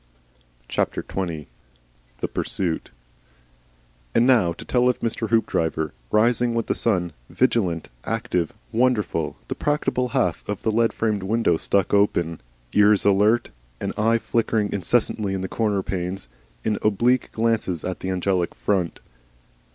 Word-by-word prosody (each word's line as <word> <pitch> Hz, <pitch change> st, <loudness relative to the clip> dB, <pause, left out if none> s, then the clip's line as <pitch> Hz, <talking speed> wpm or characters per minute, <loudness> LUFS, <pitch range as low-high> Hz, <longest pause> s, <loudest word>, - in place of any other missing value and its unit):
XX. 85 Hz, -1 st, -2 dB, 0.8 s
THE -, -, 0 dB
PURSUIT 95 Hz, -9 st, -2 dB, 1.3 s
And 120 Hz, -, +5 dB
now 115 Hz, -10 st, +4 dB
to -, -, -9 dB
tell 125 Hz, 0 st, +3 dB
of 125 Hz, -, 0 dB
Mr. 115 Hz, -1 st, -1 dB
Hoopdriver, 80 Hz, -9 st, +1 dB, 0.2 s
rising 120 Hz, +2 st, +2 dB
with 115 Hz, -, 0 dB
the -, -, 0 dB
sun, 90 Hz, -7 st, 0 dB, 0.2 s
vigilant, 95 Hz, -10 st, +1 dB
active, 110 Hz, -7 st, -1 dB, 0.2 s
wonderful, 110 Hz, -10 st, +1 dB
the -, -, -2 dB
practicable 145 Hz, -4 st, 0 dB
half 90 Hz, -8 st, 0 dB
of 105 Hz, -1 st, -3 dB
the 110 Hz, -, +2 dB
lead 115 Hz, +1 st, +2 dB
framed 105 Hz, -3 st, -1 dB
window 105 Hz, -2 st, +2 dB
stuck 100 Hz, +4 st, +1 dB
open, 85 Hz, -5 st, +2 dB, 0.3 s
ears 105 Hz, 0 st, +5 dB
alert, 105 Hz, +4 st, +3 dB, 0.3 s
an -, -, -3 dB
eye 115 Hz, +2 st, +3 dB
flickering 110 Hz, -2 st, 0 dB
incessantly 100 Hz, -1 st, +1 dB
in 95 Hz, -, -3 dB
the 95 Hz, -, -2 dB
corner 105 Hz, -2 st, 0 dB
panes, 90 Hz, -5 st, -3 dB, 0.4 s
in 105 Hz, -2 st, 0 dB
oblique 115 Hz, +4 st, +2 dB
glances 110 Hz, -7 st, 0 dB
at 90 Hz, 0 st, -3 dB
the 95 Hz, -, -4 dB
Angel 95 Hz, 0 st, +1 dB
front. 95 Hz, -5 st, -1 dB
105 Hz, 135 wpm, -23 LUFS, 90-115 Hz, 1.3 s, And